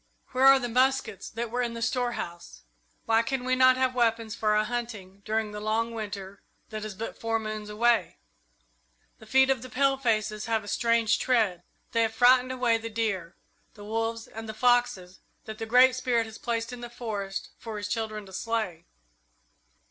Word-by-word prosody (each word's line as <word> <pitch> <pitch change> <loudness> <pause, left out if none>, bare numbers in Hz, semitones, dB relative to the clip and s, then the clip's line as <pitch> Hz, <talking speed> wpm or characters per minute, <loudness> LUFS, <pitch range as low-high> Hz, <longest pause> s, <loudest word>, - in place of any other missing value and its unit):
Where 260 +1 +4
are 270 0 +9
the 245 -2 -2
muskets 250 -4 +1
that 230 0 -5
were 245 +1 0
in 235 -1 -2
the 230 - -6
storehouse? 225 - -3 0.4
Why 225 0 +4
can 250 +2 -2
we 255 0 +1
not 255 0 +5
have 260 -1 +1
weapons 230 -3 +1
for 215 -2 +1
our 215 - +3
hunting 215 -5 -5
during 220 0 -1
the 210 - -6
long 225 +2 -1
Winter 200 -3 -6 0.3
that 215 -1 -5
is 215 -2 -6
but 225 +3 -6
four 225 0 0
moons 215 -1 -5
away? 230 +2 +1 1.0
"The 220 - -15
feet 265 +3 +4
of 260 -3 0
the 255 - -9
palefaces 240 -6 0
have 225 -2 0
a - - -12
strange 230 0 +2
tread. 220 -9 +1 0.3
They 230 - +2
have 225 0 0
frightened 250 +2 +5
away 245 -3 +1
the 230 0 -6
deer, 200 -6 -2 0.4
the 205 -1 -11
wolves, 225 +1 -2
and 225 0 -9
the 220 - -6
foxes 230 -6 +1 0.3
that 220 0 -8
the 225 - -4
Great 250 +2 +6
Spirit 245 -3 +1
has 220 0 -10
placed 230 0 -2
in 245 - -8
the 240 - -7
forest 210 -5 -5
for 225 -2 -6
his 205 0 -4
children 215 -1 -3
to 190 - -14
slay. 200 -6 -3
225 Hz, 185 wpm, -27 LUFS, 215-245 Hz, 1.0 s, are